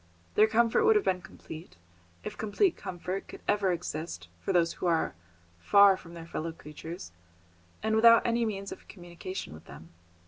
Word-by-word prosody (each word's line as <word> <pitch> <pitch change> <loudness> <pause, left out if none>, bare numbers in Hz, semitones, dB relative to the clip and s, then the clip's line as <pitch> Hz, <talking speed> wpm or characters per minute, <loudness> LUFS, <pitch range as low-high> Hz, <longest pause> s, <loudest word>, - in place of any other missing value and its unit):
Their 215 - +5
comfort 230 - +3
would 445 0 +5
have 420 - +2
been 185 -1 +1
complete, 160 - -11 0.5
if - - -6
complete 335 - +1
comfort 185 0 -5
could - - -11
ever 205 -2 +2
exist 155 - -5
for - - -2
those 170 -2 +3
who - - -3
are 165 -2 +1 0.5
far 200 - +6
from 170 -2 -12
their 165 -1 -8
fellow 165 0 -4
creatures, 160 - -9 0.7
and 220 0 +1
without 230 +1 +7
any 235 0 +2
means 200 -3 -3
of - - -10
communication 175 - -7
with 80 - -13
them. 80 - -12
185 Hz, 170 wpm, -29 LUFS, 165-220 Hz, 0.7 s, without